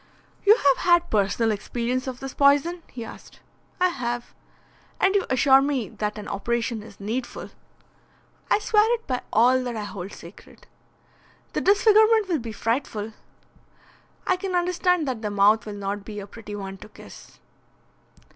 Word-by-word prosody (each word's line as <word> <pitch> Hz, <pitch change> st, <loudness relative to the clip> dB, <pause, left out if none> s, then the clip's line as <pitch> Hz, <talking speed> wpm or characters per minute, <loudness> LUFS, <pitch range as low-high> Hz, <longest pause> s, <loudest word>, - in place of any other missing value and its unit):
"You 425 Hz, -, +9 dB
have 280 Hz, -, +3 dB
had 345 Hz, -1 st, +3 dB
personal 215 Hz, +2 st, +1 dB
experience 245 Hz, +5 st, -3 dB
of 255 Hz, -1 st, -6 dB
this 270 Hz, -1 st, -6 dB
poison?" 290 Hz, +5 st, +3 dB
he 235 Hz, -2 st, -8 dB
asked. -, -, -13 dB, 0.4 s
"I 365 Hz, 0 st, +4 dB
have." 240 Hz, -6 st, -4 dB, 0.7 s
"And 390 Hz, -, +3 dB
you 400 Hz, -2 st, +1 dB
assure 265 Hz, +1 st, +5 dB
me 270 Hz, -8 st, -1 dB
that 210 Hz, 0 st, -4 dB
an 210 Hz, -, -7 dB
operation 235 Hz, +2 st, -2 dB
is 210 Hz, -1 st, -14 dB
needful." 230 Hz, +5 st, -5 dB, 1.0 s
"I -, -, +4 dB
swear 425 Hz, +1 st, +3 dB
it 460 Hz, -, -12 dB
by 255 Hz, -2 st, -2 dB
all 255 Hz, +3 st, +4 dB
that 245 Hz, -2 st, -4 dB
I 215 Hz, -, -4 dB
hold 200 Hz, -2 st, -7 dB
sacred." 170 Hz, +4 st, -14 dB, 0.9 s
"The -, -, -1 dB
disfigurement 430 Hz, +1 st, +4 dB
will 330 Hz, -4 st, +1 dB
be 230 Hz, -2 st, -6 dB
frightful." 225 Hz, -2 st, -2 dB, 1.1 s
"I 370 Hz, -, +2 dB
can 370 Hz, 0 st, -3 dB
understand 360 Hz, -2 st, +1 dB
that 250 Hz, -4 st, -3 dB
the 210 Hz, -, -2 dB
mouth 205 Hz, +2 st, +3 dB
will 210 Hz, -, -5 dB
not 200 Hz, 0 st, -4 dB
be 210 Hz, 0 st, -7 dB
a 200 Hz, -, -7 dB
pretty 205 Hz, 0 st, -9 dB
one 195 Hz, -1 st, -7 dB
to 210 Hz, -, -12 dB
kiss." -, -, -14 dB
245 Hz, 160 wpm, -24 LUFS, 210-345 Hz, 1.1 s, You